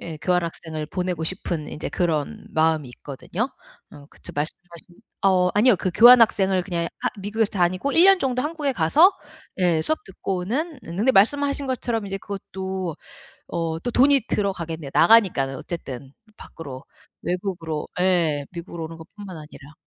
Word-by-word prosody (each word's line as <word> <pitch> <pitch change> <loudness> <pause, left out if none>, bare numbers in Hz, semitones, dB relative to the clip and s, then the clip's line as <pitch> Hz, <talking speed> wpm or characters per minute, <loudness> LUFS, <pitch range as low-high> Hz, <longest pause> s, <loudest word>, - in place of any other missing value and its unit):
예 160 -2 -7
교환학생을 165 -3 -2
보내고 180 0 -3
싶은 165 -3 -3
인제 - - -5
그런 160 -5 -2
마음이 155 -3 +1
있거든요. 175 - -4 0.4
어 145 -2 -13
그쵸 - - -10
말씀하신 170 +3 -5 0.4
어 185 -2 +4
아니요. 225 +3 +5
그 185 - -2
교환 240 +2 +9
학생을 195 -4 +3
그냥 170 -3 -2 0.2
하 - - 0
미국에서 210 +2 0
다니고 185 +7 0
1 335 - +6
년 390 0 +7
정도 255 -2 0
한국에 300 -2 -2
가서 265 - +5 0.5
예 175 -4 +2
수업 315 - -2
듣고는 215 - -3
응 165 - -7
근데 235 +6 +4
말씀하신 280 +6 +2
것처럼 235 -4 -2
이제 195 0 -4
그것도 190 -3 -5 0.5
어 165 -1 -2
또 245 - -3
돈이 275 +1 +5
들어가겠네요. 165 -7 -2
나가니까는 180 -12 +4
어쨌든 135 -4 -7 0.2
밖으로 135 -5 -10 0.4
외국으로 175 -4 -3
예 165 -6 +1
미국으로 170 -1 -7
오는 165 +1 -10
것 160 - -11
뿐만 200 -4 -8
아니라. 150 -1 -13
180 Hz, 350 characters per minute, -23 LUFS, 160-220 Hz, 0.5 s, 교환